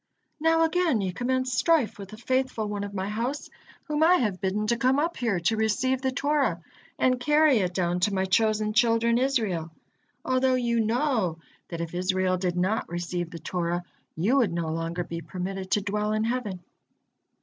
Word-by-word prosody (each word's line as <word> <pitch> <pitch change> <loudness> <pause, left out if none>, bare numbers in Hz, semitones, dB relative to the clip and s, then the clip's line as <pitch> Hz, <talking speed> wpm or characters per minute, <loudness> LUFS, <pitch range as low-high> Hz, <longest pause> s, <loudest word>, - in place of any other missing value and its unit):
Now 325 +1 +3
again 325 -6 +2
ye 190 -2 -2
commence 255 +3 -1
strife 280 -4 +2
with 195 -1 -8
the 215 - -10
faithful 255 -2 -1
one 205 -1 -3
of 205 - -5
My 190 0 -2
house, 235 +7 -3 0.3
whom 300 -1 -2
I 340 +3 +6
have 210 - -1
bidden 200 +2 -1
to 235 - +2
come 255 +3 +2
up 330 +4 0
here 225 -7 0
to 205 +7 +1
receive 250 +4 0
the 265 -1 0
Torah 280 - 0 0.4
and 255 -1 +2
carry 295 +1 +4
it 180 -2 -1
down 180 -1 0
to 190 +4 +2
My 190 0 +1
chosen 215 +2 +1
children 235 0 +3
Israel, 220 - 0 0.6
although 255 0 +2
you 235 -2 +1
know 225 - +1 0.3
that 170 -1 -5
if 170 0 -5
Israel 185 +1 0
did 180 -1 -2
not 190 +5 0
receive 175 0 -3
the 170 - -8
Torah, 175 +1 -2 0.3
you 205 +12 +2
would 235 -9 +3
no 170 -2 -2
longer 165 +2 -2
be 170 0 -6
permitted 185 +2 -5
to 205 - +2
dwell 210 +1 -1
in 215 0 0
heaven." 220 -6 -3
215 Hz, 185 wpm, -26 LUFS, 185-255 Hz, 0.6 s, I